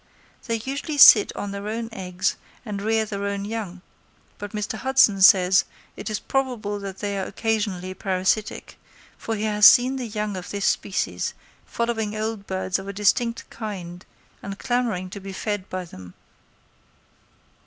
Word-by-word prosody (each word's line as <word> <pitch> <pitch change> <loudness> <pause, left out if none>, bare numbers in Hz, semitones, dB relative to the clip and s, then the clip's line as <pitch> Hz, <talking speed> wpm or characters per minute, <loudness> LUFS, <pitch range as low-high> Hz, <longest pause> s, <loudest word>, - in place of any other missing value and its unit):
They 230 - 0
usually 275 +6 -4
sit 220 -6 +9
on 205 - -4
their 200 +1 -6
own 225 +1 -3
eggs 185 -2 -2 0.3
and 205 -3 -4
rear 220 +1 +1
their 200 -1 -4
own 200 0 -3
young; 205 -4 -5 0.6
but 205 -1 -6
Mr. 210 +1 -4
Hudson 255 -6 +3
says 190 -1 +6 0.3
it 200 - -6
is 215 - -1
probable 240 -6 -2
that 195 -1 -7
they 200 -1 -3
are 190 - -2
occasionally 205 -5 -2
parasitic, 190 +2 -2 0.4
for 225 - -4
he 210 - -4
has 210 -1 +6
seen 255 +2 +5
the 250 -2 -4
young 210 -2 -3
of 180 -1 -7
this 200 -1 -3
species 195 - -1 0.3
following 225 -3 -2
old 215 -1 -4
birds 190 0 -1
of 195 - -9
a 200 - -5
distinct 230 +4 +1
kind 180 -5 -7 0.4
and 195 0 -6
clamouring 230 -8 -1
to 200 - -7
be 195 0 -8
fed 205 -1 -4
by 185 -1 -4
them. 90 - -12
205 Hz, 160 wpm, -24 LUFS, 190-225 Hz, 0.6 s, sit